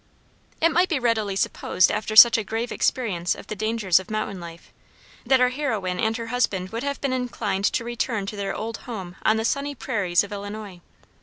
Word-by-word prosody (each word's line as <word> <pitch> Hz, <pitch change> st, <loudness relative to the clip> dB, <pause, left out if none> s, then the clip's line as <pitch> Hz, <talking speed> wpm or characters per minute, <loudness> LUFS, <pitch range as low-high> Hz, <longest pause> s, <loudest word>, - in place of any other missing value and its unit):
It 330 Hz, +1 st, +3 dB
might 355 Hz, +3 st, +3 dB
be 320 Hz, -, +1 dB
readily 225 Hz, -5 st, 0 dB
supposed 185 Hz, -1 st, +1 dB
after 215 Hz, 0 st, -3 dB
such 235 Hz, +1 st, +10 dB
a 225 Hz, -, 0 dB
grave 225 Hz, +4 st, -3 dB
experience 185 Hz, -9 st, 0 dB
of -, -, -11 dB
the 215 Hz, -, -5 dB
dangers 215 Hz, -4 st, +2 dB
of 190 Hz, -, -11 dB
mountain 215 Hz, -3 st, -3 dB
life, 170 Hz, -1 st, -11 dB, 0.5 s
that 265 Hz, +1 st, +5 dB
our 250 Hz, 0 st, +4 dB
heroine 220 Hz, -10 st, -2 dB
and 220 Hz, +1 st, 0 dB
her 230 Hz, -, -5 dB
husband 190 Hz, -7 st, 0 dB
would 230 Hz, +4 st, -4 dB
have 280 Hz, +1 st, -3 dB
been 275 Hz, -2 st, 0 dB
inclined 220 Hz, -6 st, -2 dB
to 230 Hz, -, +1 dB
return 235 Hz, -3 st, -2 dB
to 205 Hz, -, -6 dB
their 200 Hz, -1 st, -3 dB
old 225 Hz, +1 st, -4 dB
home 190 Hz, -6 st, -6 dB
on 220 Hz, -, +3 dB
the 220 Hz, -, -1 dB
sunny 280 Hz, +3 st, -1 dB
prairies 200 Hz, -10 st, 0 dB
of 205 Hz, -, -9 dB
Illinois. 205 Hz, -2 st, -7 dB
220 Hz, 205 wpm, -24 LUFS, 195-245 Hz, 0.5 s, such